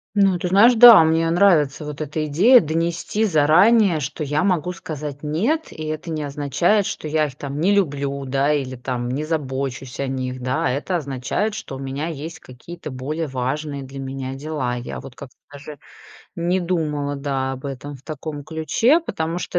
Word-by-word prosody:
Ну, 195 -3 +3
ты 180 - -2
знаешь, 205 +7 +6
да, 235 -5 +10
мне 165 +1 +2
нравится 165 -5 +3
вот 150 0 -7
эта 155 +1 -3
идея 195 - +6
донести 170 +7 -1
заранее, 175 +3 +4
что 150 +3 -4
я 150 +3 0
могу 180 -3 +1
сказать 150 -5 -7
нет, 215 - -1
и 155 - -8
это 155 +2 -5
не 155 -2 -3
означает, 145 +8 +1
что - - -5
я 155 0 +1
их 135 - -11
там 140 0 -6
не 190 +4 +3
люблю, 140 -6 -1
да, 135 +2 +1
или 135 -3 -1
там 125 -1 -4
не 135 +4 -2
забочусь 135 -4 -4
о 140 - -1
них, 130 -1 -4
да. 130 +1 -1
Это 145 +8 -2
означает, 140 - -2
что 140 - -7
у - - -8
меня 135 +3 -4
есть 160 0 -7
какие-то 150 +7 -10
более 150 +5 -4
важные 140 +2 -3
для 135 +1 -9
меня 135 -1 -5
дела. 135 -3 -3
Я 120 - -6
вот 130 - -11
как-то 130 0 -11 0.2
даже 145 +1 -10 0.6
не 175 +2 0
думала, 150 -5 -2
да, 135 -1 -2
об 135 +1 -7
этом 140 +1 -6
в - - -21
таком 150 -1 -6
ключе, 225 - +2
потому 165 +2 -3
что - - -6
150 Hz, 185 wpm, -21 LUFS, 135-170 Hz, 0.6 s, да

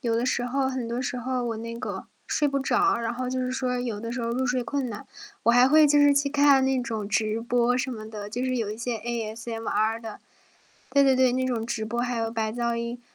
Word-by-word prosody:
有 235 -4 0
的 235 +2 0
时 245 -1 0
候 265 +2 0
很 260 -3 -3
多 235 +2 -3
时 250 -1 -3
候， 250 +1 -2
我 230 -2 -2
那 230 +1 -6
个 - - -5 0.2
睡 295 - +1
不 275 -1 0
着， 395 +9 +2
然 230 0 -2
后 255 +1 -3
就 260 - -2
是 255 - -1
说 255 -1 -1
有 235 -4 -3
的 230 +2 -5
时 250 - -3
候 230 - -2
入 255 +2 0
睡 250 0 0
困 270 0 -2
难， 210 - -8 0.4
我 235 - +6
还 245 +1 +6
会 305 +3 +6
就 290 0 +4
是 290 0 +6
去 280 0 +2
看 280 -2 +4
那 265 -1 +1
种 220 -4 -4
直 220 0 0
播 240 +1 +2
什 260 +1 -2
么 215 -3 -7
的， 210 -2 -6
就 245 +4 -3
是 255 0 0
有 225 -4 -2
一 215 - -5
些 235 0 -3
ASMR 225 -1 -2
的。 225 -2 -8 0.7
对 280 +2 +4
对 270 -1 +5
对， 255 -1 +4
那 260 +1 0
种 235 -3 -1
直 230 -1 -3
播 235 +2 -2
还 245 0 -1
有 225 0 -1
白 220 -1 -1
噪 235 +1 -1
音， 235 +1 -4
245 Hz, 285 characters per minute, -26 LUFS, 230-260 Hz, 0.7 s, 我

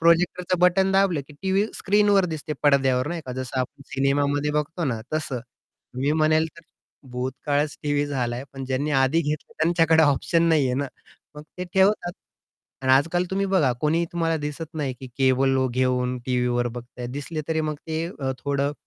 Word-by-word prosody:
प्रोजेक्टरचं 175 +2 +2
button 190 +2 +4
दाबलं, 190 -6 +3
की - - -12
TV 195 +2 +2
स्क्रीनवर 205 -1 +3
दिसते, 150 0 -5
पडद्यावर 135 -2 +3
नाही 170 -1 -3
का, 125 - -4
जसं 130 0 -4
आपण 130 +2 -5
सिनेमामध्ये 140 +2 +1
बघतो 150 +3 -1
ना 115 -5 -1
तसं. 140 -5 -2 0.5
मी 140 +4 0
म्हणेल 155 0 +3
तर 165 - -13 0.5
भूतकाळच 140 +4 -2
टीव्ही 145 -1 +1
झालाय 125 -2 -2
पण 135 -1 -6
ज्यांनी 135 +3 -1
आधी 135 +4 +3
घेतलं 150 -1 -3
त्यांच्याकडे 165 -1 +4
ऑप्शन 155 +3 +2
नाही 155 -4 +4
आहे 125 - 0
ना. 140 +1 -1 0.5
मग 150 - -9 0.2
ते 180 - -2
ठेवतात. 190 -2 +3 0.7
आणि 130 0 +3
आजकाल 165 +6 +3
तुम्ही 195 +1 0
बघा 175 -10 +3
कोणी 160 +3 +2
तुम्हाला 165 -1 0
दिसत 155 +2 -5
नाही, 140 -4 -2
की 130 - -7
केबल 135 0 +3 0.2
घेऊन 125 -1 +1
टीव्हीवर 125 -1 +1
बघताय. 120 +1 -8
दिसले 145 +5 -5
तरी 160 0 +1
मग 155 -1 -1
ते 160 +1 -2 0.3
थोडं 140 0 -1
145 Hz, 165 wpm, -24 LUFS, 130-165 Hz, 0.7 s, button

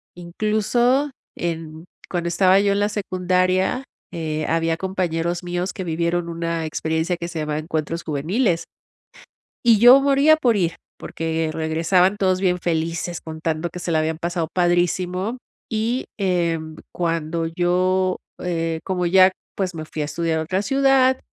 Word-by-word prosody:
incluso, 215 +9 +1 0.3
en 165 -1 -5 0.2
cuando 175 -2 -2
estaba 190 +2 +4
yo 200 0 +2
en 200 - 0
la 205 - +2
secundaria, 185 +3 0 0.3
eh, 155 -2 -3
había 165 0 +1
compañeros 175 -2 -2
míos 175 +1 -3
que 190 - -5
vivieron 170 +1 -1
una 165 -1 -2
experiencia 160 +3 -1
que 170 - -5
se 170 -2 -5
llamaba 150 0 -2
Encuentros 160 +1 -3
Juveniles. 165 - 0 1.0
Y 230 -3 +5
yo, 245 +4 +9
moría 280 +3 +5
por 245 -6 +2
ir, 170 -3 0 0.2
porque 160 0 -3
regresaban 165 +5 +2
todos 185 -2 +1
bien 180 -2 +2
felices, 170 +1 -2
contando 160 +1 -3
que 180 - -8
se 175 - -3
la 160 - +3
habían 160 0 -1
pasado 170 0 -2
padrísimo. 180 +4 0 0.3
Y, 230 +3 -1
em, 170 -5 -1 0.2
cuando 165 -1 -1
yo, 180 +2 +1 0.2
eh 165 -2 -2
como 180 -2 -1
ya 185 +1 +6 0.2
pues, 185 -3 -2
me 160 - -5
fui 155 - -5
a - - -2
estudiar 160 +2 -1
a - - -1
otra 185 +4 -1
ciudad, 270 +1 +3
175 Hz, 150 wpm, -22 LUFS, 165-190 Hz, 1.0 s, yo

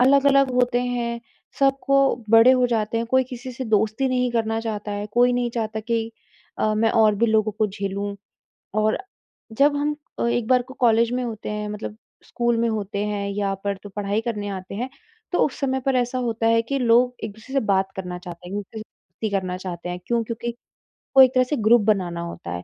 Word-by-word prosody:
अलग-अलग 275 +1 +5
होते 245 -1 +2
हैं, 240 -1 -2 0.4
सबको 275 -2 +2
बड़े 225 +2 +8
हो 250 -1 +3
जाते 225 -1 -1
हैं, 230 - -2
कोई 260 +1 +3
किसी 250 0 -8
से 260 +2 -5
दोस्ती 220 +4 +1
नहीं 250 -1 +1
करना 225 -1 0
चाहता 215 -2 -4
है, 205 0 -3
कोई 245 +1 +4
नहीं 245 -1 0
चाहता 220 -2 -3
कि 225 0 -2 0.5
अ, 215 0 +1
मैं 225 +1 +2
और 220 -2 +4
भी 230 +3 +2
लोगों 220 -1 +2
को 215 - +3
झेलूँ 200 0 -4 0.7
और 215 0 +2 0.5
जब 285 +5 +3
हम 295 +1 -1 0.2
अ, - - 0
एक 235 -1 0
बार 250 -1 +4
को 260 +1 -13
कॉलेज 230 -1 +3
में 250 - -1
होते 225 -3 -5
हैं, 210 0 -3
मतलब 210 0 -6 0.3
स्कूल 240 -1 0
में 230 0 +2
होते 205 -2 -3
हैं, 205 -1 -2
यहाँ 200 0 -1
पर 200 -1 -1
तो 205 - -8
पढ़ाई 205 +1 -2
करने 210 -3 -3
आते 190 0 -6
हैं, 245 +5 -3 0.4
तो 355 - +1
उस 275 - -7
समय 265 -1 0
पर 270 -1 +2
ऐसा 245 +1 0
होता 230 -2 -1
है 230 0 +4
कि 275 +4 -2
लोग 245 0 +4
एक 220 - -4
दूसरे 220 +6 -14
से 275 - +3
बात 195 -1 +2
करना 180 -1 -5
चाहते 175 0 -10
हैं, 190 - -6
एक 205 - -3
दूसरे 220 +3 -10 0.4
से 220 - +1
करना 185 -2 -1
चाहते 180 -2 -6
हैं 180 0 -4
क्यों? 235 -1 +1
क्योंकि 235 +1 -4 0.7
वो 265 - +11
एक 260 0 +4
तरह 255 -1 +4
से 275 +4 -2
ग्रुप 230 +1 +6
बनाना 185 -5 0
होता 170 - -7
है, 90 0 -5
225 Hz, 215 wpm, -23 LUFS, 205-250 Hz, 0.7 s, वो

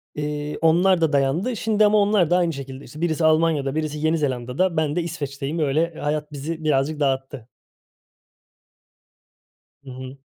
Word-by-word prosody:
Eee, 150 0 -3
onlar 175 +3 +4
da 160 -2 +2
dayandı. 145 - +1
Şimdi 215 -1 +2
ama 210 +1 +4
onlar 200 -5 +3
da 175 - +4
aynı 170 -2 +1
şekilde, 135 -1 -8
işte, 150 +6 -11
birisi 165 -1 +1
Almanya'da 155 -3 +2
birisi 155 -1 -2
Yeni 160 +2 +1
Zelanda'da, 145 +5 -1
ben 155 -2 0
de 175 - +1
İsveç'teyim. 145 -2 -4
Öyle 155 +3 +1
hayat 150 +1 -2
bizi 155 +3 -5
birazcık 150 0 +1
dağıttı. 135 -3 -2 2.4
Hı 135 - -11
hı. 130 +1 -9
155 Hz, 150 wpm, -23 LUFS, 140-165 Hz, 2.4 s, onlar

